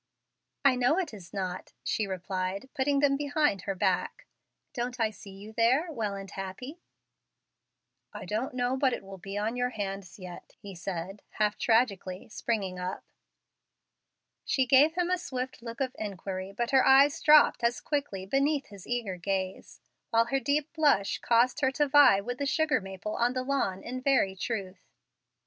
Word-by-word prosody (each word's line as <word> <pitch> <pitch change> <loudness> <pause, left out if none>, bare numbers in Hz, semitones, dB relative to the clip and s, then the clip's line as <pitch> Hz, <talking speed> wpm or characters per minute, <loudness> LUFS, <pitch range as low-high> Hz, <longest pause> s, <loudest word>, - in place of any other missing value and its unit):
"I 270 -2 +6
know 250 +6 +2
it 355 -10 -2
is 190 -4 -11
not," 185 -2 -5
she 215 - -1
replied, 185 +4 -4
putting 280 +1 +1
them 280 -1 +4
behind 290 - +1
her 195 - -1
back; - - -1 0.5
"don't 245 -1 -4
I 220 -1 +1
see 205 -1 -13
you 200 +3 -11
there 255 +9 +2
well 215 -8 -2
and 195 0 -8
happy?" 225 - -7 1.3
"I - - -8
don't 230 +5 -3
know 250 +1 0
but 265 -1 +2
it - - -4
will 195 0 -10
be 195 +3 -6
on 215 +3 -1
your 245 0 0
hands 195 -5 -5
yet," 180 -3 -11
he 200 -1 -10
said, 185 +2 -5
half 210 -1 +1
tragically, 200 -6 +1
springing 200 -5 -2
up. 180 +1 -4 1.4
She 265 - +1
gave 275 +6 +5
him 355 0 0
a 365 - +1
swift 260 -6 -5
look 230 0 -8
of 265 -2 -2
inquiry, 195 -2 -5
but 235 +5 -2
her 265 -1 +5
eyes 280 +4 +5
dropped 300 -5 +6
as 235 +1 +1
quickly 280 -11 -3
beneath 275 +6 0
his 200 -3 -12
eager 230 -7 -2
gaze, 190 +1 -4 0.3
while 230 0 +3
her 270 - +3
deep 285 +2 -1
blush 290 -12 +2
caused 240 +4 +3
her 265 - +4
to 295 +1 +1
vie 280 -8 +7
with 245 +5 -5
the 280 - -1
sugar 315 -4 +2
maple 195 +2 -6
on 240 +1 +2
the 255 0 -2
lawn 255 -9 -1
in 255 +1 -5
very 255 -8 +2
truth. 190 -3 -4
230 Hz, 170 wpm, -29 LUFS, 195-270 Hz, 1.4 s, vie